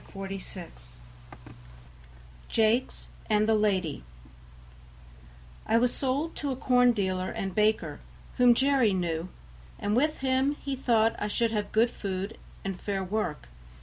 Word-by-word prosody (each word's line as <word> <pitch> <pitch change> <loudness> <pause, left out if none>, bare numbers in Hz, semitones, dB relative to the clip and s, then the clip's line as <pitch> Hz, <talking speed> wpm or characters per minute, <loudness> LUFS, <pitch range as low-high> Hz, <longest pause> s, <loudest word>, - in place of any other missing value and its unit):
Part - - -19
IV - - -18
46 190 - -7 1.5
Jakes 225 +3 +1 0.2
and 215 0 +3
the 225 - +4
Lady 190 - 0 1.6
I 225 - +4
was 240 +1 +2
sold 280 +5 -1
to 285 -2 -2
a - - -2
corn 245 -1 +4
dealer 185 -4 -1
and 195 -1 -4
baker, 215 +2 +1 0.4
whom 245 -2 +6
Jerry 265 -5 +3
knew, 170 -1 -2 0.5
and 205 +1 -1
with 305 +5 +2
him 265 +2 +1
he 275 -2 -4
thought 230 -4 +2
I 210 - -1
should 230 +2 0
have 210 -2 -2
good 230 +2 +3
food 195 +2 -5 0.3
and 195 -2 -4
fair 195 -2 -2
work. 185 - -3
215 Hz, 140 wpm, -28 LUFS, 195-250 Hz, 1.6 s, whom